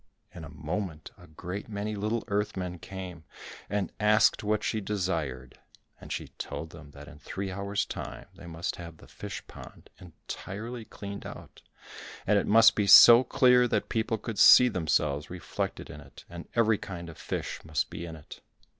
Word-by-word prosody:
In 85 - -9
a 80 - -9
moment 80 +2 -5
a - - -17
great 90 +7 -7
many 105 0 -4
little 110 +3 -2
earth 105 0 -1
men 90 -1 -4
came 90 -3 -8 0.5
and 100 -1 -2
asked 105 0 +4
what 105 0 0
she 110 - -1
desired, 80 -11 -3 0.4
and - - -11
she - - -4
told 80 - -6
them 75 -4 -13
that 70 0 -13
in 75 - -13
three 95 +4 -5
hours' 100 +2 -2
time, - - -7
they 85 - -13
must 85 0 -4
have 85 -2 -9
the - - -16
fish - - -8
pond - - -13
entirely 110 +6 -8
cleaned 100 -1 -8
out, - - -12 0.6
and 105 0 +3
it - - -3
must 110 0 +7
be 105 -2 0
so 120 +5 +10
clear 125 -1 +4
that - - -1
people 110 0 -1
could 110 0 -6
see 125 0 +8
themselves 75 -6 0
reflected 90 -1 -5
in 75 - -10
it, 70 -1 -15
and 85 0 -10
every 110 -3 +3
kind 85 -3 -7
of 80 - -10
fish - - -4
must 80 -3 -2
be - - -6
in 80 - -8
it. 75 -2 -13
95 Hz, 180 wpm, -28 LUFS, 80-105 Hz, 0.6 s, so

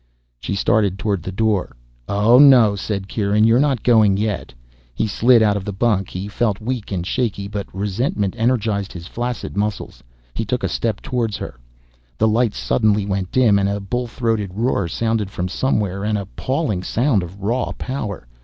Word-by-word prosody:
She 100 - -3
started 100 -1 +1
toward 100 -3 -1
the 95 - -5
door. 105 - 0 0.3
"Oh, 105 +5 +5
no," 125 -8 +7
said 100 -1 -4
Kieran. 105 0 +1
"You're 115 +2 +5
not 135 -5 +1
going 110 -5 +4
yet." 105 0 -2 0.4
He 110 - 0
slid 115 +2 +4
out 105 -1 +3
of 100 - -3
the 100 - -4
bunk. 100 -2 0
He 95 +2 -5
felt 105 -1 -1
weak 120 -1 -4
and 90 -3 -2
shaky 100 -3 -2
but 100 0 -5
resentment 100 0 -1
energized 110 -4 0
his 85 -2 -8
flaccid 120 +3 -4
muscles. 105 0 -3 0.3
He 115 - -2
took 125 +4 -2
a - - +2
step 110 -3 -2
toward 115 -4 -1
her. - - -6 0.6
The 110 - +3
lights 110 0 +1
suddenly 105 -3 +1
went 95 -2 -2
dim, 115 -6 +4
and 100 0 +1
a 100 0 -2
bull 120 +5 -3
throated 110 -5 -2
roar 110 -4 0
sounded 110 +2 -1
from 90 -2 -3
somewhere, 100 -3 -1
an 105 0 0
appalling 105 - -2
sound 115 +2 +1
of 90 +3 -9
raw 115 +6 -1
power. 105 - -5
105 Hz, 180 wpm, -20 LUFS, 100-115 Hz, 0.6 s, no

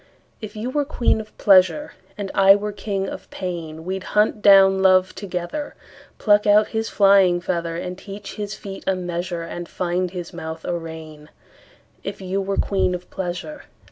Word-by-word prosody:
If 215 -1 -8
you 225 +4 -4
were 290 +1 +1
queen 245 -6 0
of 215 0 -15
pleasure, 200 +10 +4 0.2
And 200 -2 -4
I 195 0 +7
were 210 +1 -3
king 200 -1 -3
of - - -8
pain, 165 -3 -6
We'd 190 +1 -3
hunt 210 0 +3
down 195 -1 +6
love 185 -1 +4
together, 185 - -5 0.4
Pluck 210 -1 +3
out 210 +1 +5
his 225 0 -2
flying 195 -3 +5
feather, 170 -2 -2
And 180 +1 -5
teach 200 0 -9
his 210 0 -5
feet 195 -1 -9
a 190 - +2
measure, 175 -1 -4
And 175 0 -7
find 180 0 -1
his 175 -1 -7
mouth 160 -1 -7
a 175 - -1
rein; 160 -2 -9 0.7
If 200 0 -5
you 190 +1 -2
were 195 0 -2
queen 190 -2 +1
of 180 0 -10
pleasure. 190 +11 -5
190 Hz, 170 wpm, -22 LUFS, 175-205 Hz, 0.7 s, I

